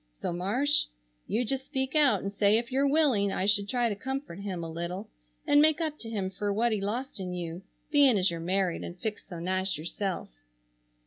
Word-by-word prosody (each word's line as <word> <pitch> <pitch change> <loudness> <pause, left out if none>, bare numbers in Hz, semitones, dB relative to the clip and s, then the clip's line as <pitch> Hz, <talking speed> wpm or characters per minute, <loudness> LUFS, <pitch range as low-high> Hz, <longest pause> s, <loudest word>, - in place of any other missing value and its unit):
So - - -4
Marsh, 240 +12 +1 0.4
you 240 +3 0
just 265 +3 -1
speak 265 -1 -2
out 295 -3 +4
and 200 0 -3
say 205 +1 +4
if 235 +2 -2
your 275 +2 +2
willing 275 -10 +3
I 190 - -1
should 205 0 +3
try 245 0 +2
to 210 - -1
comfort 265 -4 -5
him 190 -4 -4
a 165 - -5
little 175 +5 -5 0.3
and 290 0 +6
make 310 +1 +4
up 310 -2 -2
to 225 - -7
him 195 -4 -2
fer 205 +2 -2
what 230 +4 +2
he 215 -2 0
lost 235 +4 -3
in 180 -1 -4
you, 170 0 -5 0.3
being 280 -6 +6
as 185 -1 +2
you're 170 - -4
married 185 +1 0
and 175 - -7
fixed 215 +1 -4
so 175 - -7
nice 185 +1 0
yourself. 175 - -4
205 Hz, 210 wpm, -29 LUFS, 185-265 Hz, 0.4 s, and